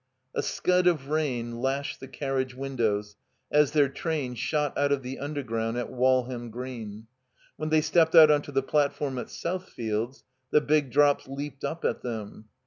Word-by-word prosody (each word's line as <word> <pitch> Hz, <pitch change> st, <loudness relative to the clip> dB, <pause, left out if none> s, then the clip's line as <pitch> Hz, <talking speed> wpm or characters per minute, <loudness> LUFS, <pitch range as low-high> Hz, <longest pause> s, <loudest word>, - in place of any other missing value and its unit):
A -, -, 0 dB
scud 180 Hz, 0 st, +1 dB
of 150 Hz, -6 st, +1 dB
rain 125 Hz, -7 st, -1 dB
lashed 135 Hz, +2 st, -1 dB
the 135 Hz, -, -9 dB
carriage 130 Hz, -2 st, -2 dB
windows 110 Hz, -6 st, -1 dB, 0.3 s
as 150 Hz, -1 st, +5 dB
their 145 Hz, -2 st, +4 dB
train 140 Hz, -2 st, -3 dB
shot 145 Hz, +4 st, -1 dB
out 145 Hz, 0 st, +1 dB
of 140 Hz, -2 st, +1 dB
the 130 Hz, +1 st, -5 dB
Undergroimd 120 Hz, -6 st, -2 dB
at 120 Hz, -, -3 dB
Walham 125 Hz, -1 st, +1 dB
Green. 115 Hz, -3 st, -7 dB, 0.5 s
When 155 Hz, 0 st, -3 dB
they 155 Hz, 0 st, +4 dB
stepped 165 Hz, +1 st, +3 dB
out 155 Hz, -2 st, +10 dB
onto 145 Hz, -1 st, +1 dB
the 135 Hz, -1 st, +1 dB
platform 140 Hz, -2 st, 0 dB
at -, -, -5 dB
Southfields, 125 Hz, -9 st, -4 dB, 0.3 s
the -, -, +5 dB
big 150 Hz, -2 st, +1 dB
drops 145 Hz, +2 st, +3 dB
leaped 140 Hz, 0 st, -6 dB
up 165 Hz, -, -3 dB
at -, -, 0 dB
them. 110 Hz, -3 st, -6 dB
135 Hz, 165 wpm, -27 LUFS, 120-150 Hz, 0.5 s, out